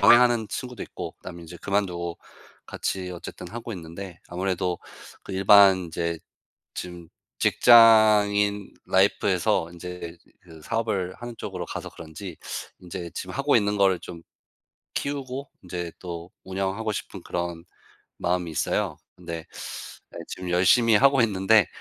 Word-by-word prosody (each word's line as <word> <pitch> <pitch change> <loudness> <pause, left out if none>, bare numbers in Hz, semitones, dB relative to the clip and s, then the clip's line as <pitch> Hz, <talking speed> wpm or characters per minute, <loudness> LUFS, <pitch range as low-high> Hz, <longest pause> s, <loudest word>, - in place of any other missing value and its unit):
병행 120 - +8
하는 120 -3 +3
친구도 125 +2 -5
있고 - - -7
그다음에 85 -2 -9
인제 85 +1 -10
그만두고 90 -4 -1 0.5
같이 95 -1 -3
어쨌든 90 -1 -8
하고 120 +1 -6
있는데 85 0 -8
아무래도 90 -1 -1 0.5
그 - - -7
일반 95 -1 +6
이제 85 0 -2 0.6
지금 90 -2 -7 0.3
직장인 105 -3 +6 0.2
life에서 80 - +2
인제 85 -1 -8 0.2
그 80 -3 -14
사업을 100 -3 -1
하는 120 -1 -8
쪽으로 90 -5 -5
가서 - - -6
그런지 85 +2 -9 0.4
인제 90 -1 -7
지금 - - -5
하고 - - +2
있는 105 0 +2
걸 95 -2 +4
좀 85 -2 -9 0.7
키우고 140 -1 -3
인제 90 -1 -5
또 85 -1 -7
운영하고 95 +3 -2
싶은 95 -3 -6
그런 85 -1 -3 0.5
마음이 90 -1 0
있어요. 80 - -1 0.2
근데 85 -2 -7 0.7
네 - - -8
지금 90 -1 -6
열심히 95 +6 +5
하고 135 +3 +5
있는데 105 -2 +4
95 Hz, 295 characters per minute, -25 LUFS, 85-105 Hz, 0.7 s, 병행